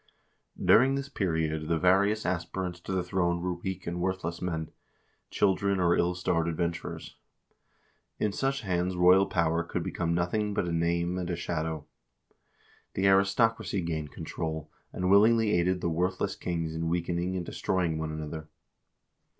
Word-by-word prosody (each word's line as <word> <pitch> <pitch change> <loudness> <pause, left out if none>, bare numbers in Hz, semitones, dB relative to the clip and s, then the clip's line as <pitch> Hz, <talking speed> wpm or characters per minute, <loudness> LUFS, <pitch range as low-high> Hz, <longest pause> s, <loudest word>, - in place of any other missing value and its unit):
During 135 +3 +5
this 140 0 -4
period 80 - -1
the 85 0 +1
various 100 +5 +3
aspirants 90 0 -2
to 85 - -7
the 95 -1 0
throne 90 -1 0
were 90 +1 -1
weak 95 +1 -5
and 85 +1 -3
worthless 90 -2 -2
men, 80 -3 -3 0.6
children, 100 0 +1
or 85 -1 +3
ill 90 +1 +1
starred 85 -2 0
adventurers. 85 0 -3 1.0
In 105 - 0
such 135 +5 -1
hands 90 -2 -1
royal 90 +2 +5
power 85 -2 +1
could - - -3
become 85 -1 -1
nothing 100 +4 0
but 90 - 0
a - - -2
name 85 +2 0
and 90 - -3
a 90 - -1
shadow. 80 -2 -3 1.1
The 95 - +1
aristocracy 100 +1 +2
gained 80 -3 -3
control, 80 -1 -5 0.2
and 90 0 -1
willingly 110 +2 +5
aided 90 0 +1
the - - 0
worthless 95 +3 -1
kings 85 -2 -3
in 80 0 -2
weakening 85 +1 -1
and 90 - -3
destroying 85 -4 -1
one 80 0 -3
another. 75 0 -6
90 Hz, 150 wpm, -29 LUFS, 85-95 Hz, 1.1 s, During